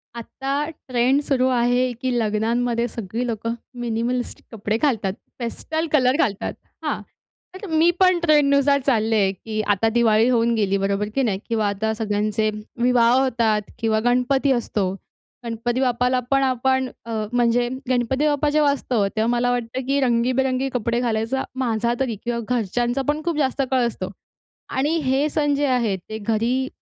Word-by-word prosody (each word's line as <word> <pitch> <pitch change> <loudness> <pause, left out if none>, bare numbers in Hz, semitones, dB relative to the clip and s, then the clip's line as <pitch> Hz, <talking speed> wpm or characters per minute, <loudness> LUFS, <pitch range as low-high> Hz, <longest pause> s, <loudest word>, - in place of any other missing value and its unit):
आता 275 +5 -3
ट्रेंड 260 -2 0
सुरु 260 -3 +1
आहे, 245 0 +2
की 255 +2 -3
लग्नांमध्ये 230 +2 0
सगळी 230 +1 -4
लोकं 230 0 -2 0.3
मिनिमलिस्टिक 240 +1 -2
कपडे 215 -1 -2
घालतात, 225 -8 0 0.3
पेस्टल 315 +7 -3
कलर 260 -3 +3
घालतात. 205 -9 0 0.3
हां, - - -2 0.5
तर 395 +3 -8
मी 320 +1 +4
पण 370 -2 +4
ट्रेंडनुसार 285 -3 +4
चालले 220 -6 +2
की 215 +3 -4
आता 215 +3 +1
दिवाळी 225 -1 +3
होऊन 235 -1 +2
गेली, 200 -3 +1
बरोबर 200 +1 -1
की 270 - +2
नाही 200 -6 0
किंवा 220 -2 +1
आता 210 +2 -1
सगळ्यांचे 215 0 0 0.3
विवाह 240 -1 +4
होतात 230 -4 +1 0.2
किंवा 220 -1 +1
गणपती 255 +3 +2
असतो. 210 -6 0 0.5
गणपती 235 +2 -2
बाप्पाला 250 0 +2
पण 275 0 +4
आपण 260 0 +1 0.2
अ, 230 - -7 0.2
म्हणजे 240 0 +2 0.2
गणपती 255 +3 +1
बाप्पा 295 0 +1
जेव्हा 295 -1 +3
असतो, 240 -7 0
तेव्हा 220 +2 -1
मला 245 0 +1
वाटतं 245 +1 -2
की 280 +1 +2
रंगीबिरंगी 255 +2 +1
कपडे 235 -1 0
घालायचा 235 +2 -1
माझा 235 -2 0
तरी 255 -4 -1
किंवा 235 -1 -2 0.2
घरच्यांचा 240 +4 -1
पण 300 +1 0
खूप 340 -3 -1
जास्त 275 -1 0
कल 255 -2 +3
असतो. 190 -5 -5 0.6
आणि 290 +5 0
हे 270 +2 +1
सण 290 -1 +1
जे 290 +1 +1
आहेत, 235 -7 +1
ते 220 - -4
घरी 230 +5 0
245 Hz, 155 wpm, -22 LUFS, 225-265 Hz, 0.6 s, मी